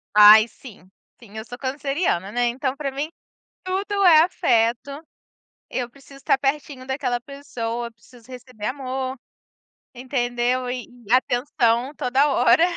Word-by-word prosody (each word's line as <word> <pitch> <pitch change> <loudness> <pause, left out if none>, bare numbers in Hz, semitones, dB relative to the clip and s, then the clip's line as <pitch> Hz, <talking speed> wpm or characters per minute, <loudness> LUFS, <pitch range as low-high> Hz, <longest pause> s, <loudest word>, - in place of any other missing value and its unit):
Ai 210 +2 +9
sim, 205 -7 -15 0.3
sim. 220 -1 -13
Eu 220 - -6
sou 245 +1 -9
canceriana, 275 - -2
né, 245 +1 +1
então 260 +2 -2
para 275 -2 -4
mim 285 +4 -4 0.5
tudo 385 +2 -3
é 320 -3 +8
afeto. 240 -8 +1 0.8
Eu 245 -2 -4
preciso 275 +1 -16
estar 270 - +1
pertinho 270 -1 -3
daquela 260 -3 -2
pessoa, 240 -4 -5
preciso 235 +1 -20
receber 250 -4 -8
amor, 260 0 -3 0.8
entendeu. 245 0 -1
E 250 -1 -4 0.2
e 220 - -8
atenção 250 0 +1
toda 270 +4 +2
hora, 275 +5 +4
255 Hz, 130 wpm, -22 LUFS, 235-275 Hz, 0.8 s, Ai